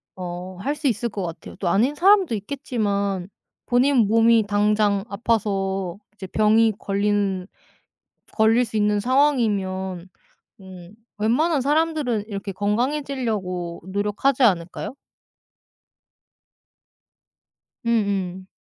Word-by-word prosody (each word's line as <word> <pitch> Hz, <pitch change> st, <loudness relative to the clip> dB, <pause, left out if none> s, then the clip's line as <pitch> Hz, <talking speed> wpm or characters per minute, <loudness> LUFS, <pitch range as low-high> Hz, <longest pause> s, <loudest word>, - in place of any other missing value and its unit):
어 180 Hz, 0 st, -7 dB
할 285 Hz, +7 st, -1 dB
수 295 Hz, -1 st, -2 dB
있을 235 Hz, -1 st, 0 dB
것 200 Hz, -3 st, -5 dB
같아요. 165 Hz, -2 st, -7 dB
또 190 Hz, -, -3 dB
아닌 235 Hz, +11 st, +2 dB
사람도 380 Hz, -, +4 dB
있겠지만 200 Hz, -5 st, -2 dB, 0.4 s
본인 250 Hz, -2 st, +3 dB
몸이 225 Hz, 0 st, +4 dB
당장 205 Hz, -1 st, +2 dB
아파서 195 Hz, -4 st, -1 dB, 0.2 s
이제 195 Hz, -2 st, -8 dB
병이 220 Hz, +3 st, +3 dB
걸린 200 Hz, -2 st, 0 dB, 0.9 s
걸릴 225 Hz, +3 st, +3 dB
수 220 Hz, -, -9 dB
있는 210 Hz, 0 st, +2 dB
상황이면 200 Hz, -8 st, 0 dB, 0.5 s
음 185 Hz, -1 st, -12 dB, 0.2 s
웬만한 275 Hz, +9 st, +2 dB
사람들은 295 Hz, -6 st, 0 dB
이렇게 200 Hz, -1 st, -5 dB
건강해지려고 210 Hz, -, -2 dB
노력하지 210 Hz, +7 st, 0 dB
않을까요? 185 Hz, +2 st, 0 dB, 2.9 s
음 -, -, 0 dB, 0.5 s
음. 190 Hz, 0 st, -13 dB
210 Hz, 225 characters per minute, -23 LUFS, 195-245 Hz, 2.9 s, 사람도